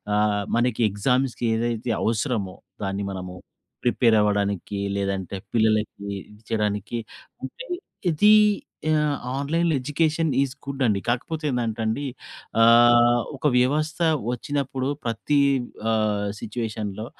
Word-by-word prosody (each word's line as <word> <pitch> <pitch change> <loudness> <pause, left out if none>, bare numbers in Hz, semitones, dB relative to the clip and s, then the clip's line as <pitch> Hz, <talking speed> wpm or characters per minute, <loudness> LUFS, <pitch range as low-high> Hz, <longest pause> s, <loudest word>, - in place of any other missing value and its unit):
ఆహ్, 105 -1 +2
మనకి 120 -1 +1
ఎగ్జామ్స్‌కి 125 +4 0
ఏదైతే 115 0 -1
అవసరమో, 110 -4 -1 0.3
దాన్ని 100 +1 -2
మనము 90 -1 -6 0.5
ప్రిపేర్ 120 -2 +4
అవ్వడానికి. 100 -1 0 0.2
లేదంటే 100 -1 -2 0.2
పిల్లలకి 110 -2 +1 0.2
ఇది 105 0 -17
చేయడానికి 105 +1 -1 0.5
అంటే, - - -7 0.5
ఇది 210 +7 +5 0.6
ఆహ్, 150 -2 +2 0.2
ఆన్లైన్ 165 +5 0
ఎడ్యుకేషన్ 155 +3 0
ఈస్ 140 -2 0
గుడ్ 140 -1 -5
అండి. 105 -4 +2
కాకపోతే 150 +6 -2
ఏందంటే 115 -2 -2
అండి. 110 +6 -1 0.6
ఆహ్, 120 +1 +6 0.2
ఒక 150 - 0
వ్యవస్థ 150 +6 +1 0.3
వచ్చినప్పుడు. 135 0 -2 0.2
ప్రతి 120 +5 0 0.5
ఆహ్, 105 -2 +1
సిట్యుయేషన్‌లో 110 -2 -4
115 Hz, 110 wpm, -24 LUFS, 105-135 Hz, 0.6 s, ఆహ్